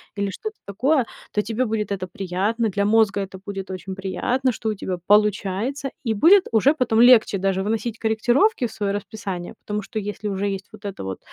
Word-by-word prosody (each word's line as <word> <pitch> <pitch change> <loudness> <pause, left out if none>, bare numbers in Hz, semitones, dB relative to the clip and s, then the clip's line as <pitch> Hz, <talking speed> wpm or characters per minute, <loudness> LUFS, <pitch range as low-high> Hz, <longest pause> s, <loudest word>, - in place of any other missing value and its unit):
или 200 -1 -1
что-то 435 - -6
такое, 255 +6 +1 0.3
то 210 - +1
тебе 230 +4 -1
будет 215 -2 -2
это 185 -2 -3
приятно, 200 +5 -1
для 200 +1 0
мозга 210 -2 +3
это 190 -1 -7
будет 195 -2 -6
очень 190 +1 -6
приятно, 240 +7 -1
что 220 -1 -3
у - - 0
тебя 185 -1 -4
получается. 210 +6 +2
И 225 -3 0
будет 360 - +6
уже 245 +7 +4
потом 235 -4 +2
легче 240 -5 +6
даже 190 0 0
вносить 225 +2 -2
корректировки 240 - +2
в - - -13
своё 200 -2 -2
расписание, 195 -3 -5
потому 210 0 -2
что 215 +2 -5
если 205 +1 -5
уже 200 0 -1
есть 195 -1 -4
вот 215 -1 -14
это 195 - -5
вот, 95 -1 -5
210 Hz, 195 wpm, -23 LUFS, 195-230 Hz, 0.3 s, будет